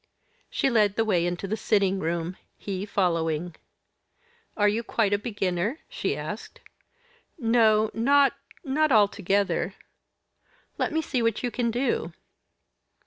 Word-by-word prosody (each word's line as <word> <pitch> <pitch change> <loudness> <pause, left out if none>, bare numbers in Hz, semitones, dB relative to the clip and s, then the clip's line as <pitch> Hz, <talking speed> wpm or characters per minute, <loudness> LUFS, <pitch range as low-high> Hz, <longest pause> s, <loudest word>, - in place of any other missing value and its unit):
She - - 0
led 210 -4 +3
the 225 - +1
way 175 -5 +2
into 175 +2 -3
the 210 - -1
sitting 200 -3 +1
room 170 +1 -2 0.2
he 195 0 -5
following. 165 -4 0 1.0
"Are 205 -1 +4
you 215 +3 +1
quite 220 -3 0
a 200 - +2
beginner?" 205 - -2
she - - -2
asked. - - -7 0.8
"No, 225 -4 +3
not 275 +4 +4 0.3
not 305 +1 +1
altogether." 200 -2 +2 1.0
"Let - - 0
me 320 +1 0
see 255 -4 -1
what 230 0 0
you 245 - -1
can 240 -1 0
do." 235 -8 -1
210 Hz, 130 wpm, -26 LUFS, 185-235 Hz, 1.0 s, Are